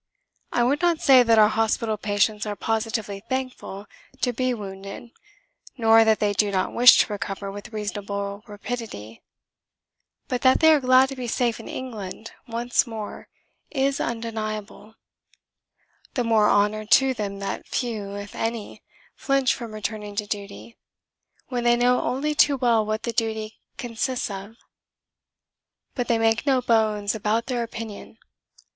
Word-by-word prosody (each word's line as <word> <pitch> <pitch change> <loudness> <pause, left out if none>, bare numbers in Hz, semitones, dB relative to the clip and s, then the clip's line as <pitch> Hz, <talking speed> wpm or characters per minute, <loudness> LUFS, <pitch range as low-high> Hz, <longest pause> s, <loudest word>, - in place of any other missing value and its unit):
I 240 - +2
would 280 +5 +1
not 345 -2 +2
say 265 -3 +7
that 230 -2 +4
our 215 -1 +7
hospital 220 0 0
patients 210 +1 0
are 205 - -3
positively 220 -2 -2
thankful 255 -6 -4 0.4
to 245 - +1
be 255 +2 0
wounded, 195 0 -7 0.7
nor 225 -1 +6
that 220 -1 +3
they 205 -1 +1
do 205 +1 +2
not 190 -2 -1
wish 245 +1 +8
to 210 - -2
recover 200 -1 -5
with 205 +3 -9
reasonable 205 -1 -4
rapidity. 205 - -7 1.1
But 250 -1 -2
that 260 0 +5
they 320 0 +7
are 300 - +4
glad 255 0 +5
to 270 - -6
be 250 -2 -5
safe 235 -1 0
in - - -10
England 225 -4 -7 0.2
once 240 +2 0
more 220 -2 -7 0.4
is 275 -1 0
undeniable. 220 -2 -5 1.2
The 245 - +1
more 220 -2 +3
honour 210 +1 +2
to 265 +3 +5
them 205 -4 -4
that 195 0 -5
few, 215 -5 -3
if 200 0 -7
any, 225 -2 -4 0.3
flinch 275 -2 +1
from 235 -2 -7
returning 215 -1 -5
to 210 0 -1
duty 205 +2 -7 0.7
when 245 -2 -2
they 240 0 +4
know 245 +1 +3
only 290 +4 -1
too 290 -1 +4
well 235 -4 +3
what 215 +1 -3
that 235 -1 -4
duty 220 -1 -2 0.2
consists 245 0 -3
of. 200 +3 -8 1.4
But 245 -3 -2
they 230 - +2
make 225 +4 +1
no 265 -2 +4
bones 215 -4 +1
about 220 +1 0
their 250 -2 -2
opinion. 225 -2 -7
225 Hz, 150 wpm, -24 LUFS, 210-245 Hz, 1.4 s, wish